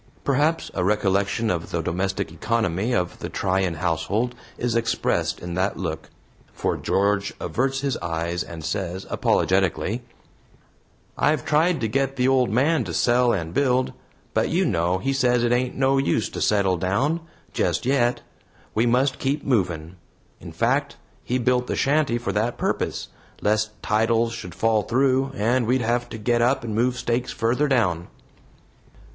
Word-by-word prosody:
Perhaps 145 +4 +1
a 90 - -1
recollection 100 +2 +1
of 85 -2 -3
the 85 -1 -2
domestic 95 +2 -2
economy 110 +3 -1
of 90 -6 -1
the - - -5
Tryan 95 -2 0
household 90 +9 -1 0.2
is 120 -1 -1
expressed 115 0 0
in 85 0 -6
that 95 +3 0
look, 80 -4 -4 0.4
for - - -1
George 100 +1 0
averts 135 +1 -1
his 140 -2 -1
eye 85 0 -3
and 80 -2 -8
says, 95 +1 -3
apologetically: 95 +3 +1 1.2
"I've 150 0 +2
tried 160 +3 +2
to 110 - +1
get 135 +4 0
the 125 -1 +2
old 130 -2 +3
man 140 +5 +2
to 85 -4 -4
sell 120 +6 +3
and 85 -5 -2
build, 130 0 +1 0.4
but - - +1
you - - +2
know 85 +2 +1
he 135 +9 -1
says 125 -3 +2
it 120 - +2
ain't 125 +1 +1
no 135 0 +3
use 135 -5 +1
to - - -6
settle 100 -3 +2
down, 125 - 0 0.3
just - - 0
yet. 125 -2 +2 0.5
We 115 +3 +2
must 130 +3 +2
keep 140 +2 -1
movin'. 90 - -1 0.4
In - - -9
fact, - - 0 0.3
he 125 - 0
built 125 0 +1
the - - -1
shanty 140 -3 +2
for 120 -4 -3
that 110 +4 -1
purpose, - - -2 0.3
lest 110 0 0
titles 115 +2 +2
should 90 -6 -7
fall 110 +1 +2
through, 130 +3 +1
and 120 +2 +1
we'd 130 +2 +2
have 120 +1 0
to - - -6
get 120 +2 +1
up 130 +2 +2
and 115 -2 -4
move 125 +3 +1
stakes 120 0 -1
further 120 +6 +1
down." 90 - +1
115 Hz, 160 wpm, -24 LUFS, 95-130 Hz, 1.2 s, old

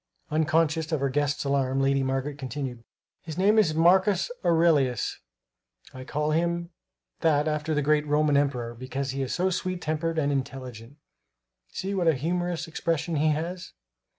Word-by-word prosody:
Unconscious 160 +1 +1
of 155 - +1
her 140 0 0
guest's 145 +1 0
alarm, 135 -1 0
Lady 135 0 +2
Margaret 135 +2 -2
continued: 130 -3 -5 0.4
"His 160 -1 -8
name 205 +4 +4
is 160 -7 +2
Marcus 185 - +3
Aurelius; 155 - +2 0.7
I 130 0 -9
call 150 +2 -1
him 170 +2 0 0.5
that 150 -2 +2
after 150 0 -1
the 150 - +1
great 150 +1 +2
Roman 150 0 +2
emperor, 125 -5 0
because 130 +3 -4
he 135 +1 -3
is 130 - -3
so 185 +1 +1
sweet 185 0 -2
tempered 160 +1 -2
and 145 -2 +1
intelligent. 130 -2 -5 0.7
See 195 - -4
what 180 -3 0
a 160 - +5
humorous 175 +3 -2
expression 165 -1 -1
he 155 +2 +2
has!" 170 +4 -2
150 Hz, 155 wpm, -26 LUFS, 135-165 Hz, 0.7 s, a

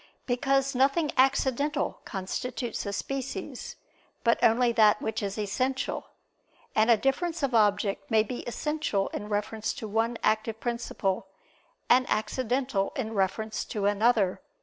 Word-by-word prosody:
Because 270 +2 +1
nothing 275 +4 +2
accidental 275 +2 +1
constitutes 225 +4 -4
a - - -1
species, 270 +6 -5 0.5
but 230 -1 +2
only 235 +2 +4
that 215 -2 +5
which 220 0 -2
is 200 0 -3
essential; 255 +6 -1 0.7
and 220 +2 +3
a 230 - +7
difference 315 - -1
of 265 -2 0
object 205 -2 +2
may 220 -1 +4
be 245 +3 -5
essential 295 -6 -1
in 210 - -6
reference 210 +1 -2
to 225 - -6
one 225 +3 0
active 220 +1 +1
principle, 220 -6 -2 0.6
and 255 +1 +4
accidental 245 -2 0
in 225 -4 -3
reference 210 +2 -1
to 205 -2 -3
another. 205 -1 +2
230 Hz, 130 wpm, -28 LUFS, 210-260 Hz, 0.7 s, a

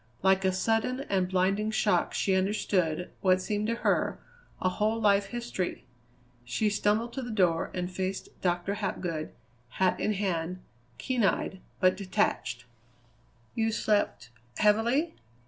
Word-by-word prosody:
Like 190 0 +4
a 190 - +3
sudden 225 +7 0
and 185 -2 +2
blinding 195 +3 +1
shock 215 -1 +2
she 195 - +1
understood, 185 -3 0
what 185 -1 +4
seemed 210 +3 -1
to 230 - 0
her, - - +2 0.4
a - - +1
whole 215 +4 0
life 200 -2 +3
history. 235 -5 -4 0.6
She 165 - 0
stumbled 215 +3 +1
to 270 - -3
the 245 - -6
door 180 -7 +2
and 180 0 -2
faced 190 +1 -3
Dr. 175 +2 0
Hapgood, 180 -6 -3 0.4
hat 185 +7 +1
in 215 - +1
hand, 185 -3 -2 0.4
keen 245 - -1
eyed, 190 -1 0 0.2
but 185 -1 +4
detached. 185 - -1 0.9
"You 225 0 +1
slept 205 - 0 0.3
heavily?" 235 +10 +3
195 Hz, 135 wpm, -29 LUFS, 185-215 Hz, 0.9 s, Like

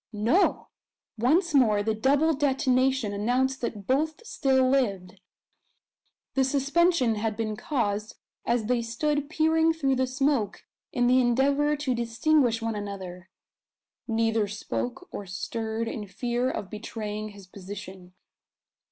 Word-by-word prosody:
No! 230 - +2 0.5
Once 310 - +2
more 215 -7 +4
the 220 +1 0
double 280 +8 +2
detonation 265 -4 +1
announced 250 +6 0
that 215 -4 -4
both 310 - 0
still 265 - +2
lived. 200 -8 0 1.1
The 270 - +3
suspension 280 0 +2
had 215 0 -2
been 215 -2 -2
caused 215 -4 -2 0.3
as 235 -2 0
they 245 +1 +1
stood 290 +5 -1
peering 320 +1 +3
through 275 -5 0
the 260 0 +1
smoke 265 -4 0 0.3
in 245 - +1
the 255 +1 +5
endeavour 280 +5 +2
to 285 -3 -1
distinguish 235 +1 +1
one 225 0 -1
another. 190 -3 -7 0.8
Neither 225 -2 +1
spoke 245 - -4
or 200 - -6
stirred 220 +5 -3
in 210 -2 -5
fear 240 +6 -1
of 195 - -5
betraying 215 -1 -5
his 200 -2 -13
position. 185 -1 -10
240 Hz, 125 wpm, -27 LUFS, 210-275 Hz, 1.1 s, the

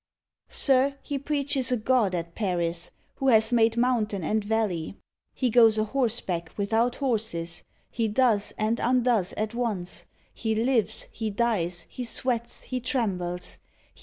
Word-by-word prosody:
Sir, 275 0 +3
he 285 -1 -3
preaches 280 -3 0
a 250 - +2
God 220 -4 +2
at 170 -1 -4
Paris 175 -4 -1 0.3
Who 270 - -1
has 220 -1 +4
made 225 -1 +3
mountain 225 -6 +1
and 215 +6 0
valley. 205 -6 -1 0.4
He 255 -3 0
goes 225 -2 +6
a 215 - +2
horseback 215 -8 -1
without 225 +4 +1
horses. 215 - -1 0.3
He 230 -1 0
does 215 -2 +2
and 220 +2 0
undoes 245 -6 +2
at 215 +1 -3
once. 215 -7 -3 0.3
He 220 -2 -1
lives, 225 -2 +1
he 220 -1 -3
dies, 190 -6 0
he 250 - -6
sweats, 235 0 -2
he 255 - -3
trembles. 185 -9 -2
225 Hz, 140 wpm, -26 LUFS, 200-245 Hz, 0.4 s, goes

